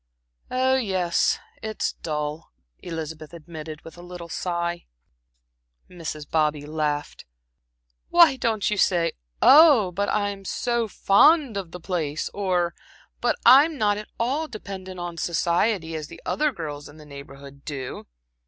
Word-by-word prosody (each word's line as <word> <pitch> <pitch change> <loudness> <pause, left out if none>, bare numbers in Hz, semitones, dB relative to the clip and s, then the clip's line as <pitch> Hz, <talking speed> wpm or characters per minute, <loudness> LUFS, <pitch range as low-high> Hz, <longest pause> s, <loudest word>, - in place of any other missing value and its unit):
"Oh, 260 +1 +2
yes, 185 -8 +1 0.2
it's 220 0 -2
dull," 150 0 -4 0.3
Elizabeth 160 -2 -7
admitted, 155 -1 -9
with 165 +1 -12
a - - -9
little 175 -1 -9
sigh. 170 0 -3 1.0
Mrs. 155 -4 -7
Bobby 150 -2 0
laughed. 150 -1 -3 0.9
"Why 340 -5 +6
don't 230 -5 0
you 210 - 0
say 175 -3 +2 0.3
'oh, 280 - +7
but 200 +3 -1
I 205 -1 +1
am 200 -1 -7
so 235 +3 -1
fond 255 - +4
of 195 -4 -4
the 180 - -9
place,' 160 -5 -3
or 180 -3 0 0.5
'but - - +2
I'm 280 +6 +7
not 205 -3 +2
at 210 - -8
all 275 +7 0
dependent 190 -6 -8
on 175 -1 -5
society,' 170 +2 0
as 155 -2 -5
the - - -12
other 300 0 +1
girls 150 - -7
in 145 - -15
the 155 - -13
Neighborhood 140 -1 -12
do?" 135 -4 -6
175 Hz, 140 wpm, -24 LUFS, 155-215 Hz, 1.0 s, oh